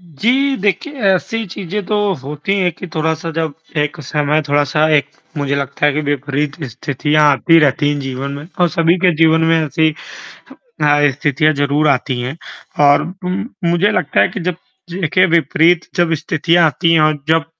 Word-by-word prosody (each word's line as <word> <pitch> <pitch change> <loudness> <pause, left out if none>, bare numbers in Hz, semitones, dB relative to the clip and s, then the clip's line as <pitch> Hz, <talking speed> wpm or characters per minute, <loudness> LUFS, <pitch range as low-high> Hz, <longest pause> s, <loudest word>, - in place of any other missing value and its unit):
जी, 240 - 0
देखिए 210 - -1 0.2
ऐसी 225 +5 -3
चीज़ें 195 +2 -5
तो 210 - 0 0.3
होती 150 +7 -3
हैं 180 -2 +1
कि 180 - -9
थोड़ा-सा 160 +1 -2
जब 160 -1 -2 0.3
एक 150 +1 -2
समय 150 +2 0
थोड़ा-सा 145 +2 +2
एक 145 -1 +2 0.3
मुझे 140 -1 -1
लगता 140 +1 -1
है 145 - +2
कि 150 - -1
विपरीत 145 +2 -2
स्थितियाँ 145 +4 -1
आती 165 +4 +4
रहती 145 -1 +2
हैं 145 - -3
जीवन 135 0 -5
में 145 +2 -8
और 175 - +4
सभी 165 +2 +2
के 180 -2 +4
जीवन 160 0 +4
में 165 - +4
ऐसी 155 +1 +1 0.6
अ, 145 - 0
स्थितियाँ 145 +2 +1
ज़रूर 145 +1 +1
आती 130 -2 0
हैं 130 +6 -5 0.5
और 145 +1 +4 0.2
उ - - -2 0.4
मुझे 175 +5 +2
लगता 180 -8 0
है - - +4
कि - - -6
जब 180 0 -2 0.4
देखिए 185 +1 +1
विपरीत 170 0 +2
जब 175 -2 +1
स्थितियाँ 165 +2 +1
आती 165 +2 +1
हैं 165 - +4
और 155 -1 +2
जब 160 0 +2
155 Hz, 175 wpm, -16 LUFS, 145-175 Hz, 0.6 s, आती